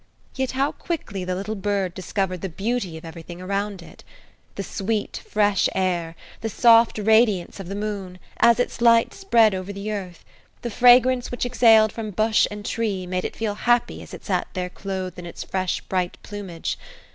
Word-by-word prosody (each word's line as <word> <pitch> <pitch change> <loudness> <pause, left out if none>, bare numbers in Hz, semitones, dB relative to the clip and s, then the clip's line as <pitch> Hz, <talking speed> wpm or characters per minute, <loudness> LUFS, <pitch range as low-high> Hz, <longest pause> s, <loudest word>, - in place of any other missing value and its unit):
Yet 265 -1 -2
how 275 +2 +1
quickly 205 - -4
the 180 0 -2
little 200 +3 -3
bird 200 -3 -1
discovered 185 -1 -2
the 190 - -3
beauty 195 -1 -2
of 160 - -11
everything 165 +1 -9
around 200 0 -3
it. - - -15 0.5
The 200 - -3
sweet, 205 +2 -3
fresh 205 -2 +2
air; 175 -3 -1 0.2
the 225 - -3
soft 230 +1 +5
radiance 215 -4 +3
of 195 - -7
the 195 - -5
moon, 200 -3 -4 0.2
as 235 0 +5
its 245 - -2
light 230 -1 +5
spread 230 - +3
over 185 +1 -4
the 200 +2 -5
earth; 185 -5 -6 0.4
the 240 - -3
fragrance 245 +2 +5
which 245 - -2
exhaled 225 -3 +5
from 225 -2 -5
bush 215 +2 +2
and 205 0 -8
tree, 210 -6 -2
made 180 0 -2
it - - -4
feel 220 -2 -2
happy 240 +3 +1
as - - -12
it - - -10
sat - - 0
there 180 -1 -3
clothed 185 -2 -5
in 175 - -7
its 170 - -7
fresh, 185 -1 -2
bright 180 -2 -2
plumage. 195 -5 -5
205 Hz, 180 wpm, -23 LUFS, 185-225 Hz, 0.5 s, soft